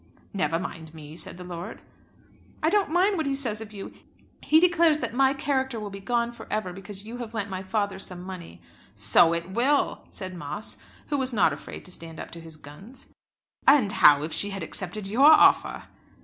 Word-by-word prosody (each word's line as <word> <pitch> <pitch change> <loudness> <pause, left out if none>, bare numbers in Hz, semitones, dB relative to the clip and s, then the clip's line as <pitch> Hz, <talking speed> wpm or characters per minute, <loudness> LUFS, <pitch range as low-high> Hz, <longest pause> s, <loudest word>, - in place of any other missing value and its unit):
"Never 185 -4 0
mind 165 -2 -7
me," 155 0 -11
said 170 +1 -4
the 180 - -9
lord. 175 -1 -7 0.8
"I 315 - +3
don't 410 -1 +2
mind 370 +4 +2
what 315 -3 -1
he 275 - 0
says 230 -6 -2
of 220 -1 -9
you. 200 -2 -9 0.5
He 315 - +4
declares 340 -3 +4
that 305 - -4
my 265 +1 +3
character 265 -3 -1
will 210 -1 -6
be 195 - -8
gone 235 +3 -1
for 240 - -12
ever 200 -4 -2
because 195 +2 -6
you 230 +2 -7
have 235 -2 -7
lent 200 -2 -3
my 185 0 -4
father 200 0 -2
some 180 -2 -6
money." 175 - -10 0.3
"So 165 - +5
it 170 +2 -3
will," 265 +7 +1
said 185 -1 -6
Moss, 175 +5 -6 0.3
who 285 - 0
was 260 -1 0
not 180 -8 +3
afraid 145 - -9
to 180 - -7
stand 165 -2 -9
up - - -8
to 170 - -9
his 160 -1 -9
guns. 190 - -12 0.6
"And 270 -8 +5
how 145 -5 +6
if 155 - -4
she 205 - +4
had 195 -3 -5
accepted 190 +5 -3
your 240 +9 +4
offer?" 315 - +5
200 Hz, 205 wpm, -26 LUFS, 175-260 Hz, 0.8 s, how